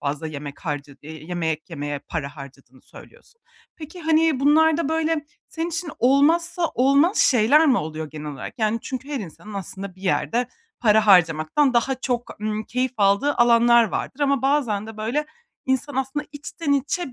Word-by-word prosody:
fazla 145 +2 -3
yemek 145 -2 -8
harca 145 -3 -5
eee, 155 0 -10
yemek 160 -2 -3
yemeye 145 -2 -4
para 145 0 -6
harcadığını 135 -2 -13
söylüyorsun. 475 -1 -17 0.4
Peki, 320 +3 -10
hani, 320 -3 +2
bunlarda 315 +1 +3
böyle 320 -1 -1 0.2
senin 330 +1 -4
için 335 -1 -4
olmazsa 330 +7 +3
olmaz 280 - +3
şeyler 260 +6 +5
mi 260 -4 +4
oluyor 155 0 -5
genel 150 -1 -8
olarak? 140 - -9
Yani 220 0 +1
çünkü 260 +1 -6
her 285 -3 -3
insanın 205 +3 -10
aslında 195 0 -6
bir 190 - -18
yerde 235 +5 0 0.3
para 215 -2 +4
harcamaktan 180 - +4
daha 240 +3 +2
çok, 245 -3 -4
ımm, 215 0 -3
keyif 255 +2 -2
aldığı 205 +8 +2
alanlar 235 0 +5
vardır 255 +7 -5
ama 280 -3 +1
bazen 260 -7 0
de 225 -1 -10
böyle 240 +8 -2 0.4
insan 265 +1 -1
aslında 270 +3 -2
içten 290 +1 -4
içe 280 +2 -1
240 Hz, 160 wpm, -22 LUFS, 175-290 Hz, 0.4 s, şeyler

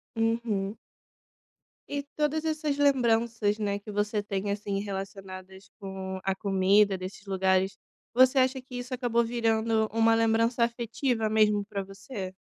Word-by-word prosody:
Uhum. 225 -3 -1 1.1
E 285 0 -3
todas 305 +1 0
essas 305 -2 -1
lembranças, 230 -6 +2
né, 205 -1 -1
que 205 +1 -9
você 205 +1 0
tem 200 0 -3
assim 200 -1 -2
relacionadas 190 -1 -7
com 190 -1 -5
a 195 -1 0
comida 195 +1 +3
desses 185 +2 -8
lugares. 190 0 +1 0.4
Você 255 +2 +5
acha 260 0 +2
que 255 -1 -11
isso 245 +1 -5
acabou 240 -2 +1
virando 225 -1 +1
uma 225 0 +4
lembrança 230 +1 +2
afetiva 235 0 -1
mesmo 210 -1 +3
pra 200 -1 -4
você? 195 0 -7
215 Hz, 135 wpm, -28 LUFS, 195-235 Hz, 1.1 s, Você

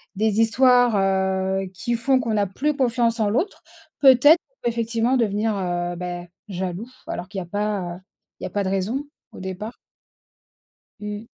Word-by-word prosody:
des 215 +1 +1
histoires, 245 0 +4
heu, 190 0 +1
qui 240 +6 -2
font 260 +3 +2
qu'on 230 -3 -1
n'a 205 -1 +2
plus 295 +10 -1
confiance 240 -3 +1
en 210 -1 +2
l'autre, 330 - -1 0.4
peut-être 280 +5 +7 0.3
effectivement 230 +2 +1
devenir, 215 -1 +1
heu, 175 -1 -2
ben, 175 0 -5 0.2
jaloux, 190 +3 -4 0.2
alors 180 - -4
qu'il 195 0 -5
y - - -3
a - - -7
pas 200 -3 -2 0.4
il - - -11
y - - -1
a - - -8
pas 205 -1 0
de 190 - -1
raison 205 +9 -1 0.3
au - - -11
départ. 190 +5 -6 1.3
Mmh. 210 +1 -5
210 Hz, 165 wpm, -23 LUFS, 190-240 Hz, 1.3 s, peut-être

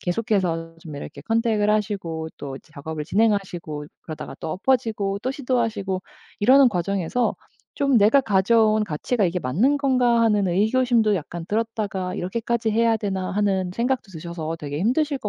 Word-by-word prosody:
계속해서 175 -4 -1
좀 155 -3 -9
이렇게 - - -8
컨택을 225 -2 +1
하시고 195 -7 -1
또 135 -2 -7
작업을 150 0 -7
진행하시고 190 -7 0 0.2
그러다가 155 -2 -7
또 160 - -4
엎어지고 210 -2 0
또 255 - -1
시도하시고 230 -8 -1 0.4
이러는 260 +4 +7
과정에서 195 +4 -1 0.4
좀 275 -2 +3
'내가 215 +7 +5
가져온 215 0 +3
가치가 205 +5 -1
이게 180 +1 0
맞는 215 - +2
건가.' 250 -4 +3
하는 210 -3 +3
의구심도 220 +3 +2
약간 170 0 -6
들었다가 205 -4 -2
'이렇게까지 225 +4 -1
해야 230 +1 +3
되나.' 190 -3 -3
하는 190 -2 0
생각도 245 -3 -1
드셔서 165 0 -5
되게 145 0 -4
힘드실 275 - +1
것 210 - -4
205 Hz, 375 characters per minute, -23 LUFS, 175-230 Hz, 0.4 s, 이러는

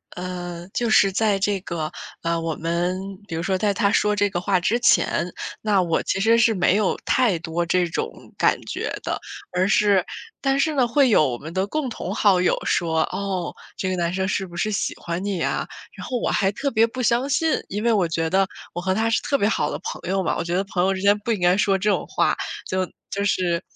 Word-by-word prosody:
呃， 175 -1 -6
就 235 -2 0
是 195 -2 +5
在 210 0 +2
这 200 0 0
个， 160 -4 -4 0.3
呃， 170 0 0
我 165 -2 -2
们 170 +2 -1 0.3
比 165 - -5
如 165 - -2
说 190 0 0
在 205 +1 +1
他 200 0 +2
说 210 0 +2
这 205 0 +2
个 175 -2 -3
话 185 0 +2
之 225 +7 +1
前， 180 -6 +2 0.3
那 205 -3 +2
我 165 -1 0
其 - - -1
实 225 +3 +4
是 230 -1 +4
没 180 +1 +3
有 205 -2 +1
太 235 -9 +3
多 170 0 -2
这 180 0 +2
种 165 - -3 0.3
感 - - +3
觉 - - -3
的。 - - -2 0.4
而 185 +1 +2
是 200 -2 +4 0.4
但 275 0 +1
是 315 +1 +2
呢， 255 -4 +2
会 265 +2 +3
有 155 -9 +5
我 120 -2 -3
们 160 +5 -9
的 190 +1 0
共 280 +3 -2
同 - - -5
好 195 -4 +4
友 180 - +2
说： 160 -2 +1
“哦！ 190 -3 -3 0.2
这 190 - -2
个 185 - -1
男 170 0 0
生 190 0 -1
是 195 -1 -1
不 175 - -12
是 215 +4 0
喜 200 - -1
欢 170 +2 -4
你 200 -2 -2
呀？” - - -1 0.3
然 - - -8
后 250 - -1
我 - - -1
还 195 -1 +2
特 275 +6 -2
别 225 0 +4
不 255 +2 -5
相 240 +4 +2
信， 315 +3 +1
因 205 +3 -4
为 235 - +3
我 190 -5 +2
觉 165 0 -1
得 195 0 +3 0.3
我 175 - -4
和 185 +1 0
他 225 +2 +1
是 - - +2
特 280 -1 +1
别 205 - +2
好 225 - 0
的 - - -3
朋 - - -6
友 195 0 +1
嘛。 - - 0
我 - - -1
觉 175 +1 -2
得 190 - +1
朋 190 -2 -1
友 190 - +3
之 190 - -4
间 200 +1 +5
不 230 +3 -3
应 210 - 0
该 175 +1 +4
说 195 -1 +3
这 210 +2 0
种 - - 0
话， - - +1 0.3
就 185 0 -1 0.3
就 200 - -1
是 175 -4 +1
195 Hz, 260 characters per minute, -23 LUFS, 175-215 Hz, 0.4 s, 是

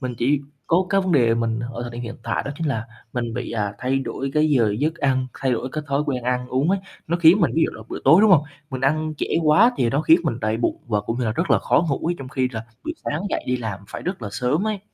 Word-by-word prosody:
mình 130 -2 -4
chỉ 140 +4 +2 0.3
có 180 +3 +2
cái 195 - +4
vấn 185 -2 -1
đề 120 -6 +4
mình 115 -1 -1
ở 120 +1 -5
thời 120 - -5
điểm 120 +1 -6
hiện 115 0 -6
tại 115 - -1
đó - - -2
chính 165 - -2
là 115 -5 -2 0.3
mình 120 -2 -3
bị, 125 - -4
à, 105 -3 -2
thay 130 +2 0
đổi 135 0 -4
cái 155 0 +3
giờ 115 -7 +3
giấc 155 +4 0
ăn, 135 -5 0
thay 130 -1 0
đổi 120 +2 -2
cái 155 - -3
thói 140 0 +1
quen 130 -4 -1
ăn 125 0 -1
uống 135 +7 +1
ấy, 195 - +2 0.3
nó 170 - 0
khiến 175 +3 +6
mình, - - +3
ví 160 - +3
dụ - - -1
là 110 - -10
buổi - - -5
tối, 155 +8 +7
đúng 215 0 +5
hông, 165 -6 +6 0.3
mình 130 -1 -4
ăn 155 +3 0
trễ - - -2 0.2
quá 175 +11 +6
thì 120 - +1
nó 140 - +1
khiến 160 +2 +5
mình 125 -7 -1
đầy 110 +1 0
bụng 120 - 0
và 105 -3 0
cũng 115 +4 -4
như 125 - 0
là 110 - 0
rất - - -2
là - - +5
khó 160 - +2
ngủ 140 +2 -1
ấy, 175 - +1
trong 135 -2 -7
khi 130 -1 0
là 110 0 -5 0.2
buổi - - -3
sáng 150 - -2
dậy - - -2
đi 125 - +1
làm 110 -5 -5
phải - - -7
rất 180 -6 -4
là 105 - -3
sớm 140 - 0
ấy. 215 -2 -1
130 Hz, 295 wpm, -22 LUFS, 120-155 Hz, 0.3 s, tối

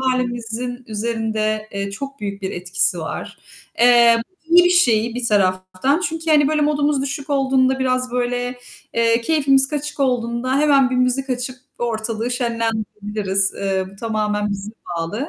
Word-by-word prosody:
hâlimizin 245 -1 -2
üzerinde, 215 -1 -2
eee, 200 0 -3
çok 275 +6 -7
büyük 200 -1 -5
bir 190 - -2
etkisi 180 0 0
var. 160 - -6 0.4
Eee, 235 -1 +6 0.2
iyi 350 +2 +6
bir 355 - +4
şey 235 -10 +3
bir 245 -1 -2
taraftan 185 - +1
çünkü 325 -2 -2
hani 295 -2 +5
böyle 305 0 +1
modumuz 290 -1 +1
düşük 280 +1 -5
olduğunda, 265 -1 +2
biraz 255 -1 0
böyle, 245 0 -2 0.4
eee, 230 0 +3
keyfimiz 275 -1 +3
kaçık 300 0 -4
olduğunda 250 0 0
hemen 280 -3 +4
bir 255 - 0
müzik 255 +2 +1
açıp 250 +1 -3 0.2
ortalığı 230 0 -2
şenlendirebiliriz. 215 -5 -1
Eee, 190 -1 -1
bu 195 - -16
tamamen 210 -1 -1
bize 200 +1 -5 0.3
bağlı. 205 - -3
240 Hz, 145 wpm, -20 LUFS, 215-270 Hz, 0.4 s, Eee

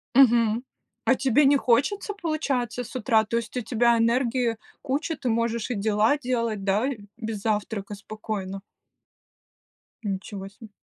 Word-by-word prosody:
Мгм. 235 -3 +5 0.4
А 265 - +5
тебе 270 +2 +3
не 280 +1 +6
хочется, 285 - +1
получается, 270 -7 -1
с 245 - -11
утра? 225 -2 +3
То 230 +2 -1
есть 235 +2 -4
у 250 - 0
тебя 235 +1 +3
энергии 235 0 +1 0.2
куча, 300 +4 -1
ты 255 - -2
можешь 230 +1 0
и - - -1
дела 215 +5 +2
делать, 230 -6 -1
да? 205 +6 +2
И 260 -6 -3 0.2
без 220 -3 -4
завтрака 210 -1 -2
спокойно. 200 -2 -5 1.4
Ничего 195 0 -4
се. 215 +2 -14
230 Hz, 145 wpm, -25 LUFS, 215-255 Hz, 1.4 s, не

